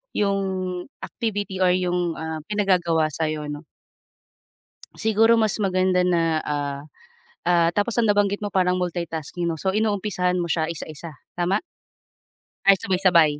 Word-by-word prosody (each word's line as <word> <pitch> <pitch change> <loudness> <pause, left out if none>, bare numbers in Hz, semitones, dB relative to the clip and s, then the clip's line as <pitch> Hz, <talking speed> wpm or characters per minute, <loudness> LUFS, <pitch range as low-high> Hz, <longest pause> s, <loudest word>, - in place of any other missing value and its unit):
yung 200 -1 +1 0.6
activity 205 -5 -3
or 180 -1 +4
yung, 180 -2 -1
ah, 160 0 -4
pinagagawa 175 -6 +1
sa'yo 155 -1 -2
'no. 145 +2 -8 1.3
Siguro 220 +1 +3
mas 215 -2 +1
maganda 185 -2 +2
na, 175 -2 +2 0.2
ah, 145 -1 -2 0.6
ah 170 -1 +3
tapos 210 +3 0
ang 235 - +3
nabanggit 205 -1 +2
mo 205 - -4
parang 185 -1 +2
multitasking 170 -1 -3
'no? 160 - -4
So 190 +4 -1
inumpisahan 205 -4 0
mo 175 - -1
siya 160 -1 0
isa-isa, 155 -2 -8 0.2
tama? 180 +3 0 1.0
Ay 195 - +8
sabay-sabay? 180 -7 +3
180 Hz, 130 wpm, -23 LUFS, 165-200 Hz, 1.3 s, Ay